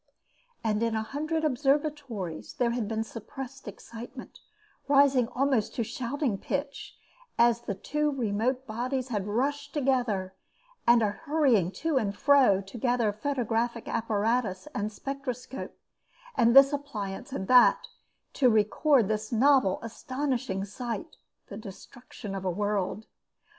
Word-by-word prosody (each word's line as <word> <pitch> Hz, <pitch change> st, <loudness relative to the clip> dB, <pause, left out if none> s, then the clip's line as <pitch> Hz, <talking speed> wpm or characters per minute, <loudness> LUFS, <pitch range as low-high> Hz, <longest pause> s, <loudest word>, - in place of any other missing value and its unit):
And 215 Hz, -1 st, 0 dB
in 230 Hz, -1 st, +1 dB
a 220 Hz, -, 0 dB
hundred 310 Hz, +6 st, -2 dB
observatories 275 Hz, -, -1 dB
there 235 Hz, -1 st, +1 dB
had 235 Hz, -3 st, -2 dB
been 220 Hz, 0 st, -1 dB
suppressed 250 Hz, +4 st, -9 dB
excitement, 235 Hz, +5 st, -10 dB, 0.5 s
rising 275 Hz, -3 st, +4 dB
almost 255 Hz, -3 st, 0 dB
to 235 Hz, -, 0 dB
shouting 245 Hz, 0 st, -2 dB
pitch, 280 Hz, 0 st, -4 dB, 0.4 s
as 235 Hz, 0 st, +4 dB
the 215 Hz, -4 st, -4 dB
two 300 Hz, +9 st, -1 dB
remote 250 Hz, 0 st, -1 dB
bodies 255 Hz, +3 st, -3 dB
had 205 Hz, -4 st, -2 dB
rushed 285 Hz, +7 st, -1 dB
together, 245 Hz, -9 st, 0 dB, 0.5 s
and 235 Hz, -1 st, +6 dB
a 205 Hz, -, +2 dB
hurrying 265 Hz, -, +2 dB
to 320 Hz, -4 st, +2 dB
and 205 Hz, -4 st, -1 dB
fro, 265 Hz, -9 st, +5 dB
to 195 Hz, +5 st, -10 dB
gather 240 Hz, -3 st, +1 dB
photographic 235 Hz, -1 st, -1 dB
apparatus 220 Hz, -1 st, 0 dB
and 210 Hz, -4 st, -2 dB
spectroscope, 265 Hz, +1 st, -6 dB, 0.6 s
and 235 Hz, -, +4 dB
this 275 Hz, +1 st, +8 dB
appliance 250 Hz, -4 st, -5 dB
and 190 Hz, -8 st, -4 dB
that, 250 Hz, -1 st, +6 dB, 0.5 s
to 255 Hz, -3 st, +4 dB
record 225 Hz, +3 st, +3 dB
this 215 Hz, 0 st, -2 dB
novel 255 Hz, -4 st, +4 dB
astonishing 255 Hz, -4 st, -3 dB
sight, 225 Hz, +1 st, -6 dB, 0.3 s
the 200 Hz, -, -9 dB
destruction 210 Hz, +1 st, -10 dB
of 195 Hz, -1 st, -4 dB
a 185 Hz, -, 0 dB
world. 205 Hz, +2 st, -1 dB
240 Hz, 130 wpm, -28 LUFS, 210-275 Hz, 0.6 s, this